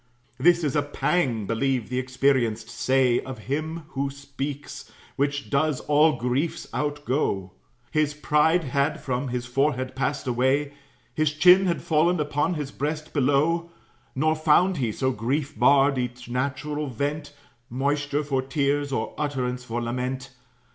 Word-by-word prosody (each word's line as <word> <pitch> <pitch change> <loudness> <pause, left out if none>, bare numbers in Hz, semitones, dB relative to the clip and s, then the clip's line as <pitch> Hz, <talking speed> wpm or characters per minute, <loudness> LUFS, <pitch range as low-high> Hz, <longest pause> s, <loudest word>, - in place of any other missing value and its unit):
This 170 +4 +4
is 145 -2 0
a 145 - +3
pang, 145 - 0
believe 125 +1 -1
the 125 0 -1
experienced 125 -4 0
say 130 -2 +2
Of 130 -1 -7
him 155 +4 -3
who 140 -1 -2
speaks, 140 +1 -7 0.2
which 140 0 -1
does 145 0 +1
all 150 +1 +4
griefs 125 +7 -1
outgo. 145 -10 -1 0.4
His 150 -1 +1
pride 150 +3 +2
had 140 +2 0
from 130 +1 -2
his 125 0 -3
forehead 130 0 0
passed 140 +2 -1
away, 130 +4 +1 0.4
His 155 -1 +1
chin 180 +4 +6
had 170 - -1
fallen 165 +2 +2
upon 150 +3 0
his 145 -3 -4
breast 150 +2 -4
below; 150 +5 +2 0.5
Nor 155 +4 +2
found 160 +4 +3
he, 120 -5 0
so 130 +4 0
grief 135 +6 -2
barred 140 -1 +4
each 125 0 -4
natural 140 +4 -2
vent, 145 +4 -3 0.4
Moisture 145 +3 -1
for 135 -2 0
tears, 140 +1 0
or 135 - -2
utterance 125 -4 -2
for 120 0 -3
lament. 125 +2 -3
140 Hz, 140 wpm, -25 LUFS, 130-150 Hz, 0.5 s, chin